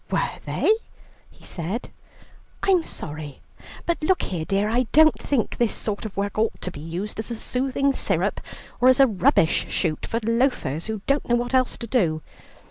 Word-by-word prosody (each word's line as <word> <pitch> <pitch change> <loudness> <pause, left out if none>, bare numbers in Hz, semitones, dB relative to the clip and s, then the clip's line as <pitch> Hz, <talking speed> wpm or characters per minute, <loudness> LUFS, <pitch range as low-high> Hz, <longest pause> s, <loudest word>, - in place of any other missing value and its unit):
"Were - - -1
they?" - - +2 0.6
he - - -19
said, 185 +8 -4 0.7
"I'm 370 -4 +4
sorry. 150 - -7 0.5
But 340 -2 -1
look 370 +4 +2
here, 170 -4 -3
dear, 200 +3 +1
I 240 +2 +1
don't 315 +1 +7
think 265 -6 -1
this 235 -3 +1
sort 210 0 -3
of 210 - -7
work 200 +1 -1
ought 220 0 0
to 185 - -4
be 145 - -9
used 175 +8 -5
as 220 - -4
a 235 - -3
soothing 270 +4 0
syrup, - - 0 0.4
or 255 - +5
as 260 0 +6
a 275 - +9
rubbish 180 -7 +2
shoot 160 -4 -1
for 230 - -1
loafers, 230 - 0
who 220 -2 -4
don't 275 -1 0
know 240 - +5
what 240 +2 -2
else 255 -1 +2
to 235 - -5
do. 175 - +1
225 Hz, 185 wpm, -24 LUFS, 180-260 Hz, 0.7 s, a